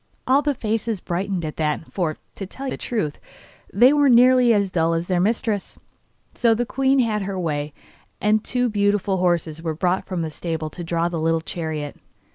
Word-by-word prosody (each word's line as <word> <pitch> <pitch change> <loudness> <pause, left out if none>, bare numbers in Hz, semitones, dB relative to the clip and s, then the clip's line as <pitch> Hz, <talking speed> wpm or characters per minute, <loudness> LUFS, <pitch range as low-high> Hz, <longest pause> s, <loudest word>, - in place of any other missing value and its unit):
All 270 +2 +4
the 290 -1 0
faces 225 -2 -2
brightened 180 0 -2
at 155 - -6
that, 155 0 -2
for, 165 -5 -1 0.2
to 195 - -7
tell 270 +7 -7
the - - -2
truth, 185 -12 -3 0.5
they 245 +7 +6
were 290 -2 +4
nearly 250 0 +6
as 200 -3 +2
dull 165 -1 +1
as 165 +1 -2
their 180 -2 +1
mistress; 210 +1 -1 0.6
so 230 -2 +3
the 240 +2 -1
queen 270 +2 +1
had 225 -5 +1
her 195 -1 -3
way, 150 -3 -2 0.5
and 210 +1 +2
two 250 0 0
beautiful 205 -2 +1
horses 170 -3 0
were 160 -2 -3
brought 180 +3 0
from 180 -3 -2
the 160 - -4
stable 160 -1 -4
to 175 - -7
draw 170 0 0
the 170 -1 -3
little 165 0 +2
chariot. 160 -3 -4
190 Hz, 190 wpm, -22 LUFS, 165-225 Hz, 0.6 s, they